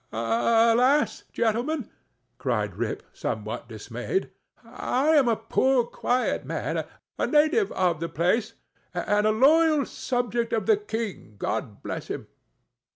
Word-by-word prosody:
"—"Alas! 230 - +3
gentlemen," 240 +4 0 0.5
cried 110 -6 -1
Rip, 110 +1 -3
somewhat 110 +2 -4
dismayed, 115 - -3 0.3
"I 270 +5 -1
am 295 -5 +5
a 230 - +3
poor 245 +3 +2
quiet 250 +1 -1
man, - - -3 0.3
a - - +1
native 310 +7 +3
of 175 -4 +1
the 165 0 -3
place, 210 - 0 0.4
and 210 +1 +1
a - - +4
loyal 300 +5 +4
subject 240 -2 -2
of 225 - 0
the 435 - +4
king, 225 - -5
God - - -3
bless - - -5
him!" - - -5
230 Hz, 125 wpm, -26 LUFS, 165-270 Hz, 0.5 s, am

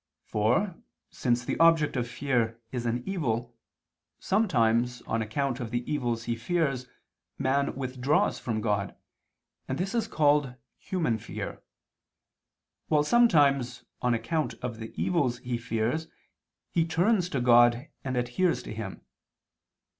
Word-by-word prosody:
For, 165 - +1 0.3
since 120 -1 0
the - - -2
object 165 -3 +5
of 120 -2 -1
fear 120 -4 0
is 120 -2 -3
an 120 +1 -1
evil, 120 -10 -2 0.6
sometimes, 125 - +1
on 115 - -1
account 125 +4 -1
of 120 -3 -4
the 120 +1 -2
evils 120 -6 -1
he 115 0 -1
fears, 135 0 -1 0.5
man 140 +2 +1
withdraws 130 +2 0
from 110 -3 -2
God, 105 -3 -1 0.7
and 130 - -2
this 190 +2 -2
is 230 -2 0
called 145 - +2 0.2
human 160 -12 -1
fear; - - -6 1.3
while 150 -1 +3
sometimes, 145 - +3 0.2
on 125 -1 +2
account 150 +7 -1
of 120 -3 -4
the 110 0 -7
evils 145 -9 +1
he 120 -1 -3
fears, 115 +7 -1 0.6
he 170 - +2
turns 175 +3 +2
to 140 - -1
God 120 +2 +5 0.2
and 130 -2 -2
adheres 125 +9 +1
to - - -7
Him. 105 -3 -6
125 Hz, 130 wpm, -28 LUFS, 120-155 Hz, 1.3 s, object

